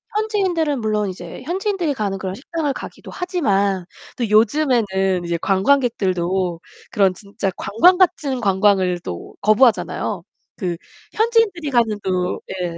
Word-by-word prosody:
현지인들은 370 - 0
물론 210 -2 0
이제 180 +4 -8
현지인들이 365 - -1
가는 200 -4 -2
그런 190 0 -4
식당을 295 +3 -3
가기도 - - -9
하지만 200 - 0 0.3
또 235 - -1
요즘에는 210 -6 +2
이제 170 0 -1
관광객들도 190 -6 +1 0.3
그런 195 -3 +3
진짜 200 0 -4
관광 355 - +4
같은 310 -8 +1
관광을 190 -3 +2
또 85 - -7
거부하잖아요. 215 +2 +2 0.3
그 180 -5 -3 0.4
현지인들이 440 -8 +1
가는 225 -4 +2
또 185 -1 -1 0.2
예 170 -2 -3
215 Hz, 315 characters per minute, -20 LUFS, 190-305 Hz, 0.4 s, 관광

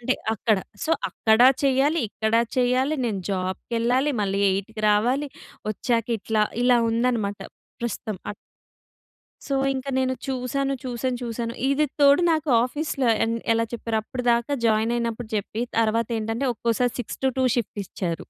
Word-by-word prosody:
అంటే 255 +2 +1 0.2
అక్కడ. 215 -1 +1 0.3
సో 320 - -2 0.2
అక్కడ 220 0 +2 0.2
చెయ్యాలి, 275 +4 +3
ఇక్కడ 220 +2 -2 0.2
చెయ్యాలి, 255 +4 +2
నేను 205 -5 -1
జాబ్‌కెళ్ళాలి. 230 +8 0
మళ్ళీ 200 0 0
8కి 200 +3 -3
రావాలి. 250 +8 +2 0.4
ఒచ్చాక 230 +1 -1
ఇట్లా 215 +1 +1 0.2
ఇలా 245 -1 +5
ఉందన్నమాట 230 -4 0 0.4
ప్రస్తుతం. 225 -2 -3
అ - - -6 1.1
సో 275 - -1 0.2
ఇంకా 265 +1 -4
నేను 260 0 +1
చూసాను, 270 +1 -1
చూసాను, 250 0 -2
చూసాను. 230 0 -3 0.2
ఇది 295 +2 +2
తోడు 285 +4 +6
నాకు 310 -2 0
ఆఫీస్‌లో 275 -1 -1 0.2
ఎ - - -2 0.3
ఎలా 230 0 +1
చెప్పారో 230 -1 -2
అప్పటిదాకా 240 +2 0
జాయిన్ 220 +1 +2
అయినప్పుడు 230 -1 -3
చెప్పి 210 +2 -3 0.2
తర్వాత 230 0 +1
ఏంటంటే 225 +5 -2
ఒక్కోసారి 235 +2 0
6-2 260 +1 -1
షిఫ్ట్ 215 -2 -3
ఇచ్చారు. 170 -4 -4
235 Hz, 135 wpm, -24 LUFS, 220-260 Hz, 1.1 s, తోడు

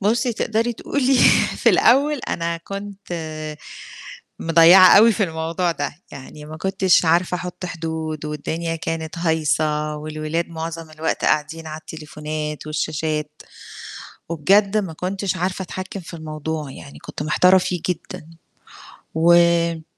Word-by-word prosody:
بُصّي 235 +5 +1
تقدري 225 +2 -1
تقولي 270 +3 0 0.4
في - - +2
الأول 285 +4 +4
أنا 170 0 -2
كنت 200 +2 -8 1.3
مضيّعة 170 +3 +7
أوي 225 +3 +7
في 215 0 0
الموضوع 165 +1 -1
ده، 145 -2 -4 0.2
يعني 145 +2 -10
ما 155 +1 -9
كنتش 190 0 +2
عارفة 175 +2 +2
أحُط 180 +1 -6
حدود، 160 -2 -5
والدنيا 160 +2 -3
كانت 160 0 -5
هايصة 155 -2 0
والولاد 155 +2 -3
مُعظم 165 0 -6
الوقت 155 +1 -2
قاعدين 155 +2 0
على 155 0 -6
التليفونات 150 -1 -6
والشاشات، 155 0 -3 0.9
وبجد 195 +6 +2
ما 190 -6 -3
كنتش 190 +3 -3
عارفة 185 +1 -2
أتحكّم 185 +2 -6
في 170 0 -11
الموضوع، 155 -2 -5
يعني 140 - -12
كنت - - -7
محتارة 180 +5 +4
فيه 180 -1 -2
جدًا، 165 -3 -5 0.9
وم 170 0 +3
165 Hz, 125 wpm, -21 LUFS, 155-185 Hz, 1.3 s, مضيّعة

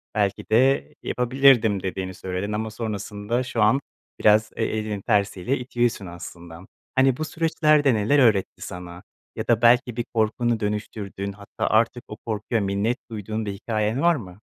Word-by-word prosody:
belki 100 -1 0
de 130 - +3
yapabilirdim, 125 -5 +3
dediğini 95 0 -3
söyledin 95 +3 -4
ama 110 +1 -2
sonrasında 105 +1 -3
şu 120 -3 -2
an 110 +6 +4 0.4
biraz 105 0 +4
e - - -1
elinin 110 -2 -3
tersiyle 105 +3 0
itiyorsun 120 -4 -1
aslında. 85 -1 -10 0.3
Hani, 130 -1 +4
bu 155 - -2
süreçler 155 -2 +2
de 135 -3 +4
neler 110 +7 +2
öğretti 110 -7 +2
sana? 90 0 -8 0.3
Ya - - -4
da 115 -2 +3
belki 120 0 +4
bir 120 - -1
korkunu 115 +1 +1
dönüştürdün, 105 -1 -4
hatta 100 0 -5
artık 115 +2 +2
o 105 - -8
korkuya 110 +1 -1
minnet 100 +5 0
duyduğun 110 0 -4
bir 100 - -3
hikâyen 110 +4 -1
var 170 0 +4
mı? 95 -8 -9
110 Hz, 155 wpm, -24 LUFS, 100-120 Hz, 0.4 s, an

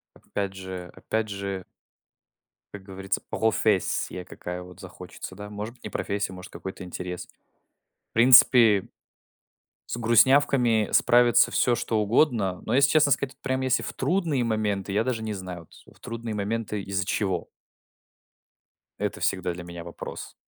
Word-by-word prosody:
Опять 100 -1 -4
же, 95 -1 -7
опять 110 -1 -3
же. 100 -1 -4 1.1
Как 100 - -9
говорится, 95 0 -3
профессия 105 -4 0
какая 90 +1 -7
вот 90 0 -14
захочется, 95 0 -9
да. 105 +1 -8
Может 105 +3 -6
быть, - - -26
не - - -5
профессия, 100 -1 -2
может, 90 0 -10
какой-то 95 0 -7
интерес. 90 0 -6 0.8
В - - -57
принципе 115 -3 +7 1.0
с - - -3
грустнявками 120 -1 +4
справится 120 0 +5
всё 120 - +2
что 110 -2 -1
угодно. 105 - +2
Но, - - 0
если 135 +1 +5
честно 155 -2 +4
сказать, 130 -1 0
прям, 130 0 -1
если 130 0 +1
в - - -5
трудные 165 -9 0
моменты, 105 -3 -1
я 105 - +2
даже 115 -3 -2
не 110 - -3
знаю, 90 -4 -7 0.2
вот, - - -20
в - - -29
трудные 115 -1 -5
моменты 105 0 -2
из-за 95 -1 -2
чего? 95 -4 -2 1.5
Это - - -2
всегда 90 - 0
для 90 +1 -8
меня 85 -1 -8
вопрос. 85 0 -8
105 Hz, 145 wpm, -26 LUFS, 95-120 Hz, 1.5 s, принципе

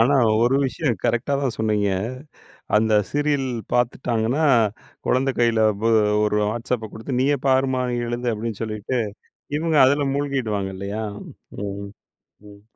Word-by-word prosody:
ஆனா 135 +5 +4 0.3
ஒரு 125 +3 +3
விஷயம் 125 - -1
கரெக்டா 125 +4 +1
தான் 130 -4 -1
சொன்னீங்க 105 -2 +1 0.9
அந்த 110 0 +2 0.2
சீரியல் 145 -2 0 0.3
பாத்துட்டாங்கன்னா, 120 +2 0 0.6
குழந்தை 130 +2 +2
கையில 115 -2 +3 0.2
ப் - - +2 0.4
ஒரு 105 0 +1
Whatsappப 115 0 -3
குடுத்து, 125 +3 -4
"நீயே 140 +2 +3
பாரும்மா, 130 -1 +2 0.3
எழுது." 120 +1 -2
அப்படின்னு 110 -1 -5
சொல்லிட்டு, 110 +3 -3 0.6
இவுங்க 160 -1 +1
அதில 140 +1 +2
மூழ்கிடுவாங்க 125 -9 -1
இல்லையா? 100 +3 -4 0.6
ம் 100 0 -5 0.6
ம். 100 0 -15
120 Hz, 120 wpm, -22 LUFS, 110-135 Hz, 0.9 s, ஆனா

